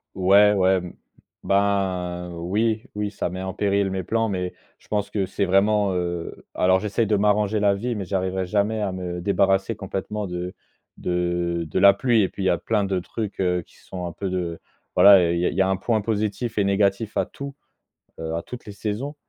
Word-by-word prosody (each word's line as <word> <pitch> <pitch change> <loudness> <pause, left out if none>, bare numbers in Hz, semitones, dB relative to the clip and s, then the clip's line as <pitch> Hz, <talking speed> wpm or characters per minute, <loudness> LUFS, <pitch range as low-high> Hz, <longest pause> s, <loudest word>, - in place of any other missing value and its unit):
Ouais, 100 +2 +5
ouais, 95 -1 +3
mmh 90 - -8 0.5
ben 95 -3 0
oui, 105 +6 -1
oui 105 -1 -2
ça 100 - -3
met 95 +2 -6
en 95 -1 -4
péril 100 -1 +1
mes 95 -1 -2
plans 115 0 0
mais 90 -3 -3 0.2
je - - -26
pense 105 -1 -1
que 100 -3 -1
c'est 100 +1 -1
vraiment, 100 +1 +3
heu, 85 -1 -4
alors 95 +1 +3
j'essaye 105 +2 0
de 105 - +2
m'arranger 105 +1 +2
la 100 -1 +3
vie 120 +4 -3
mais 100 - -3
j'arriverai 95 0 -1
jamais 105 +3 0
à 100 -2 -1
me 90 -1 -5
débarrasser 95 +2 +2
complètement 100 +1 -4
de 90 +1 -5 0.4
de 85 -1 -1
de 80 - -2
la 100 +1 +8
pluie 115 0 +2
et - - +2
puis 100 - -6
il - - +2
y - - +4
a 85 - +2
plein 105 +3 0
de 95 -2 0
trucs, 105 +3 -5
heu, 90 -1 +1
qui - - -23
sont 90 -1 -7
un 85 - -4
peu 95 +3 -4
de 90 -2 -3 0.4
voilà, 95 -4 +7
il 85 - 0
y 90 - +1
a - - +3
il - - -6
y 95 - +2
a 95 - +2
un 95 - +1
point 110 +2 0
positif 110 +1 -2
et 100 - +3
négatif 100 +2 +1
à - - +1
tout, 140 0 -8 0.6
heu, 80 0 -3
à 85 - -2
toutes 125 -1 -9
les 105 - -8
saisons, 110 +9 -4
100 Hz, 220 wpm, -23 LUFS, 90-105 Hz, 0.6 s, la